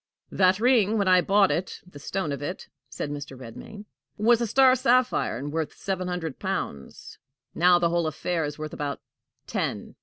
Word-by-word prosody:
"That 185 Hz, 0 st, +3 dB
ring, 225 Hz, -3 st, +3 dB
when 200 Hz, -2 st, +1 dB
I 185 Hz, -1 st, +6 dB
bought 195 Hz, +1 st, +3 dB
it 185 Hz, -, -3 dB
the 180 Hz, -5 st, -13 dB
stone 170 Hz, +1 st, -3 dB
of 140 Hz, -1 st, -4 dB
it," 175 Hz, +6 st, -5 dB, 0.2 s
said 145 Hz, -, -5 dB
Mr. 145 Hz, -2 st, -7 dB
Redmain, 130 Hz, -, -10 dB, 0.3 s
"was 230 Hz, +2 st, +3 dB
a 235 Hz, -, 0 dB
star 260 Hz, +3 st, +5 dB
sapphire, 255 Hz, -, +2 dB
and 145 Hz, +4 st, -6 dB
worth 160 Hz, -1 st, -3 dB
seven 185 Hz, -2 st, -3 dB
hundred 170 Hz, -5 st, -4 dB
pounds; 70 Hz, -1 st, -5 dB, 0.3 s
now, 175 Hz, +1 st, +5 dB
the 170 Hz, -1 st, +1 dB
whole 170 Hz, -1 st, 0 dB
affair 165 Hz, +2 st, -2 dB
is 145 Hz, -1 st, -4 dB
worth 155 Hz, 0 st, -6 dB
about 145 Hz, -1 st, -4 dB, 0.5 s
ten." -, -, -3 dB
180 Hz, 180 wpm, -26 LUFS, 150-205 Hz, 0.5 s, I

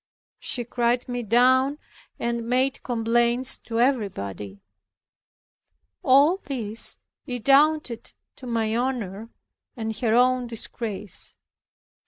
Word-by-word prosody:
She 245 Hz, -, -1 dB
cried 240 Hz, +1 st, 0 dB
me 245 Hz, -1 st, -3 dB
down, 255 Hz, +5 st, +3 dB, 0.4 s
and 235 Hz, -1 st, -3 dB
made 260 Hz, +2 st, +1 dB
complaints 240 Hz, +2 st, +1 dB
to 230 Hz, -1 st, -4 dB
everybody. 105 Hz, -, -1 dB, 1.4 s
All 285 Hz, +7 st, +5 dB
this 230 Hz, -, -1 dB, 0.3 s
redounded 275 Hz, +1 st, +2 dB, 0.3 s
to 255 Hz, -, -10 dB
my 225 Hz, -2 st, 0 dB
honor 230 Hz, -4 st, -3 dB, 0.5 s
and 220 Hz, -1 st, -3 dB
her 230 Hz, -3 st, +1 dB
own 250 Hz, 0 st, +3 dB
disgrace. 220 Hz, -4 st, -5 dB
240 Hz, 95 wpm, -24 LUFS, 225-255 Hz, 1.4 s, All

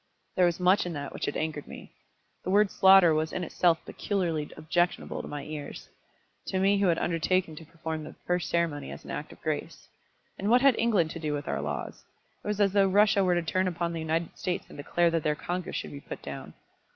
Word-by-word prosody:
There 180 Hz, -1 st, +5 dB
was 170 Hz, 0 st, -1 dB
much 180 Hz, +1 st, +3 dB
in 175 Hz, -, -4 dB
that 145 Hz, -2 st, -5 dB
which -, -, -3 dB
had 145 Hz, -, -2 dB
angered 155 Hz, -2 st, -3 dB
me. -, -, -11 dB, 0.5 s
The -, -, -4 dB
word 205 Hz, +1 st, +4 dB
slaughter 190 Hz, -3 st, +7 dB
was 155 Hz, +1 st, 0 dB
in 180 Hz, -, -3 dB
itself 170 Hz, -1 st, +1 dB
peculiarly 170 Hz, -7 st, -2 dB
objectionable 175 Hz, +3 st, 0 dB
to -, -, -9 dB
my 145 Hz, -1 st, -5 dB
ears, 150 Hz, -2 st, -7 dB, 0.6 s
to 190 Hz, -, -1 dB
me 195 Hz, +1 st, +3 dB
who 200 Hz, -, +3 dB
had 170 Hz, -2 st, +3 dB
undertaken 170 Hz, 0 st, 0 dB
to 160 Hz, -, -10 dB
perform 160 Hz, -1 st, -5 dB
the 155 Hz, -, -10 dB
first 180 Hz, -1 st, 0 dB
ceremony 165 Hz, -4 st, -1 dB
as -, -, -9 dB
an -, -, -7 dB
act -, -, -5 dB
of -, -, -14 dB
grace. -, -, -4 dB, 0.5 s
And 200 Hz, -, -1 dB
what 245 Hz, +2 st, +5 dB
had 275 Hz, -1 st, +6 dB
England 200 Hz, -9 st, +2 dB
to 165 Hz, -, -6 dB
do 155 Hz, -2 st, -2 dB
with 145 Hz, 0 st, -4 dB
our -, -, -1 dB
laws? -, -, -5 dB, 0.4 s
It -, -, -8 dB
was 210 Hz, 0 st, -1 dB
as 200 Hz, -2 st, +3 dB
though 200 Hz, -1 st, +5 dB
Russia 205 Hz, +1 st, +4 dB
were 180 Hz, -1 st, +3 dB
to 175 Hz, -, 0 dB
turn 185 Hz, +3 st, 0 dB
upon 170 Hz, -1 st, -2 dB
the 165 Hz, -, -3 dB
United 160 Hz, +1 st, -2 dB
States 180 Hz, 0 st, -3 dB
and -, -, -12 dB
declare 170 Hz, +4 st, +1 dB
that 165 Hz, -1 st, +1 dB
their 150 Hz, 0 st, 0 dB
Congress 180 Hz, +3 st, -4 dB
should -, -, -4 dB
be 140 Hz, -, -8 dB
put -, -, -8 dB
down. -, -, -7 dB
175 Hz, 230 wpm, -28 LUFS, 160-190 Hz, 0.6 s, slaughter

